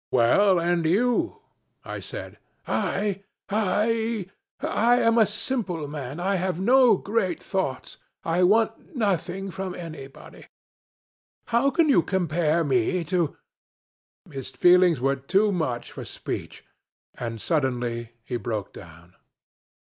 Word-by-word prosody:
'Well, 185 - +4
and 170 0 +1
you?' 245 - +1 0.4
I - - -5
said. - - -8 0.3
'I! 200 -1 -1 0.3
I! 220 +1 0 0.3
I 235 +3 +2
am 230 0 +3
a 220 - +5
simple 210 - -2
man. 145 0 -6
I 195 +2 0
have 185 -1 -2
no 245 +1 +5
great 195 -6 -1
thoughts. 180 -8 -3 0.3
I 165 +2 +1
want 220 - +2
nothing 195 - -1
from 190 0 -5
anybody. 155 -6 -10 1.1
How 240 +4 +4
can 325 +3 +2
you 270 - +5
compare 170 -3 +1
me 140 +5 +1
to.. 170 -1 -1 0.4
.?' - - -27
His 135 -2 -6
feelings 175 +3 +5
were 135 +2 +1
too 195 +10 +2
much 150 -10 -2
for - - -7
speech, - - -6 0.5
and 115 -2 -5
suddenly 120 -5 -1
he 120 +1 -3
broke 105 -2 -4
down. 85 0 -14
180 Hz, 125 wpm, -25 LUFS, 140-210 Hz, 1.1 s, a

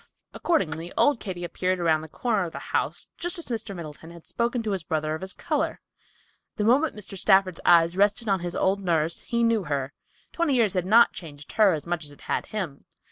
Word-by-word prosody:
Accordingly, 170 - -1
old 285 -5 +4
Katy 180 -3 -5
appeared 185 +1 -1
around 160 -2 +2
the 160 - -9
corner 215 0 0
of 165 - -7
the - - -6 0.2
house - - -1
just 350 +2 -1
as 340 - -6
Mr. 225 -4 -4
Middleton 160 -1 -9
had 170 -1 -13
spoken 235 0 -1
to 215 - -2
his 190 -2 -1
brother 155 -1 -1
of 155 - -5
his 190 0 -4
color. - - -2 0.8
The 210 - -1
moment 265 +7 +3
Mr. 205 -2 -9
Stafford's 190 -1 +3
eye 170 -1 +7
rested 205 +4 +2
on 195 -2 +2
his 175 0 -5
old 195 +1 +1
nurse, 170 -3 0
he 235 0 -1
knew 230 -4 +2
her. 140 -1 -2 0.4
Twenty 335 -5 +1
years 225 -6 +3
had 180 -1 -1
not 230 +4 +6
changed 145 -4 -10
her 210 -4 +4
as 150 -3 -4
much 170 -1 -2
as 145 - -6
it 145 - -17
had - - -2
him. 185 -10 -5
185 Hz, 215 wpm, -26 LUFS, 165-225 Hz, 0.8 s, eye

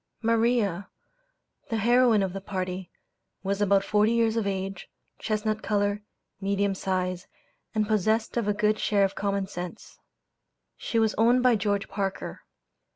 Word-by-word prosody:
Maria, 225 -4 +1 0.8
the 225 - -1
heroine 235 -1 +4
of 190 -2 -2
the 195 - -5
party, 185 -2 -4 0.5
was 200 +1 -1
about 200 -1 +3
forty 210 +2 +2
years 230 -1 +2
of 225 -3 0
age, 195 -1 -4 0.3
chestnut 215 0 -1
color, 205 -1 0 0.4
medium 200 0 +1
size, 185 -2 -2 0.5
and 215 -1 +1
possessed 220 +1 +1
of 235 -4 0
a - - +3
good 210 +1 +1
share 205 -2 +2
of 195 - -3
common 200 -1 -1
sense. 180 +2 -8 0.8
She 230 - -3
was 220 -1 +3
owned 240 +3 +4
by 250 -2 +5
George 200 -1 -1
Parker. 195 -1 -4
205 Hz, 145 wpm, -27 LUFS, 195-220 Hz, 0.8 s, by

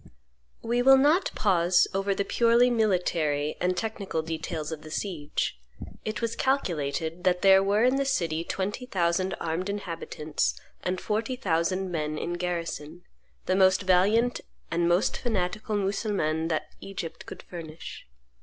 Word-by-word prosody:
We 240 +2 +1
will 270 +2 +7
not 305 +8 +4
pause 180 -5 +3
over 195 +1 0
the 200 - -1
purely 235 +3 +4
military 170 -9 +1
and 180 0 +1
technical 200 -5 -3
details 160 -1 -4
of 160 -1 -5
the 155 - -11
siege. 155 - -3 0.4
It 215 +2 -4
was 230 0 -1
calculated 165 - -1
that 180 -1 +2
there 195 0 +7
were 200 +3 +2
in 255 +2 +4
the 275 - +1
city 165 -11 0
twenty 205 +8 -3
thousand 185 -2 0
armed 170 +4 -2
inhabitants 165 -6 -2 0.2
and 185 0 -2
forty 220 +4 -1
thousand 185 -3 0
men 155 -2 -2
in 175 - -3
garrison, 175 -2 -4 0.4
the 185 - +1
most 190 0 +4
valiant 205 +7 +3 0.3
and 170 0 +1
most 175 +3 +2
fanatical 215 -1 -2
Mussulmans 195 -5 0
that 155 - -2
Egypt 180 -4 -7
could - - -9
furnish. 165 - -9
185 Hz, 145 wpm, -27 LUFS, 165-215 Hz, 0.4 s, will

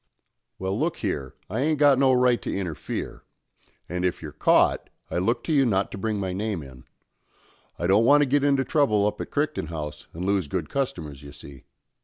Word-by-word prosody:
"Well, 95 +3 -2
look 165 +2 0
here, 75 - -3
I 110 - -3
ain't 150 +3 +1
got 140 -2 +5
no 135 -1 +5
right 125 -1 +3
to - - -3
interfere; 90 -6 -5 0.6
and 90 0 -3
if 90 - 0
you're - - -7
caught, - - +2 0.2
I - - 0
look 115 +6 0
to 160 - -1
you 140 -2 +5
not 100 -6 +1
to - - -6
bring 110 0 -1
my 95 -2 -2
name 100 -4 -3
in. 65 -2 -13 0.9
I 85 - -3
don't 100 +5 +4
want 145 +3 +6
to - - +4
get 140 +1 +1
into 140 -2 +2
trouble 110 -9 +2
up 105 - -1
at - - -6
Crichton 150 - -1
House 75 -2 -6
and 90 +3 -5
lose 100 -4 +1
good 85 -1 -3
customers, 80 - -3
you 70 -1 -11
see. 70 -1 -13
100 Hz, 205 wpm, -25 LUFS, 85-135 Hz, 0.9 s, want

